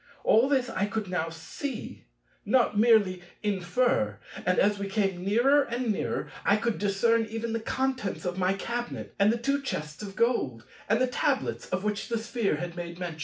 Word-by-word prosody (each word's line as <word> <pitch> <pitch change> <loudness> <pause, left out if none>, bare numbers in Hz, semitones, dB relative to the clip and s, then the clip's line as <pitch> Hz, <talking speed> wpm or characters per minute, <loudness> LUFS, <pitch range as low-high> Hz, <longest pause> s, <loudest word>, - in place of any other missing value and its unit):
All 235 +5 +5
this 260 -3 +2
I 200 - 0
could 205 -2 -3
now 165 -2 0
see, 220 - -6 0.4
not 235 0 +3
merely 205 -4 +4 0.2
infer; 185 - +1 0.3
and 180 - +3
as 205 +1 +3
we 200 0 -3
came 195 -3 0
nearer 240 +9 +4
and 240 -2 -1
nearer, 205 - -2
I 200 - +4
could 230 0 -1
discern 225 +3 +2
even 225 +1 -3
the 230 - 0
contents 260 -4 -2
of 180 0 -1
my 185 0 +2
cabinet, 240 +5 -4
and 200 +2 +5
the 235 - 0
two 275 +4 0
chests 150 - -4
of 195 -2 -7
gold, 135 - 0 0.2
and 225 +2 +3
the 255 - +4
tablets 265 +2 -1
of 185 +1 -1
which 210 0 -2
the 235 - 0
Sphere 230 -4 -1
had 170 +2 -5
made 170 0 -6
mention. 175 -3 -5
210 Hz, 185 wpm, -28 LUFS, 185-235 Hz, 0.4 s, All